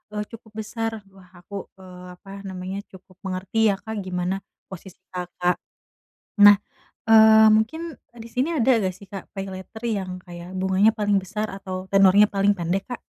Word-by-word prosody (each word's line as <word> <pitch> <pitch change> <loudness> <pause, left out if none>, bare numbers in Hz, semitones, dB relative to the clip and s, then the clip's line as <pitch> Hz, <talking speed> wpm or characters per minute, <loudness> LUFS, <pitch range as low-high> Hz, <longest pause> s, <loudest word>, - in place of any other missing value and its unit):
eee, 210 - -1
cukup 225 -1 -12
besar. 225 -1 -4
Wah, 190 -2 -18
aku, 195 +2 -8
eee, 180 -1 -12
apa 195 +2 -15 0.2
namanya, 190 +1 -5
cukup 185 -1 -17
mengerti 190 +4 0
ya - - -1
Kak 220 -2 -6
gimana 185 0 -2 0.3
posisi 185 0 -11
Kakak. 180 0 -2 0.9
Nah, 205 0 +8 0.5
eee, 220 0 +8
mungkin, 320 +9 -1
eee, 240 - -22
di 225 - -9
sini 265 +7 +1
ada 250 +3 +3
nggak 185 -1 -1
sih 200 - -14
Kak 195 -1 -9
paylater 195 +3 -8
yang 190 -4 -3
kayak 175 +2 -8
bunganya 190 +3 +3
paling 205 -3 0
besar 210 +3 -3
atau 185 -1 -6
tenornya 195 +1 +6
paling 200 0 +1
pendek 175 +3 -1
Kak? 245 - -4
195 Hz, 165 wpm, -23 LUFS, 185-220 Hz, 0.9 s, Nah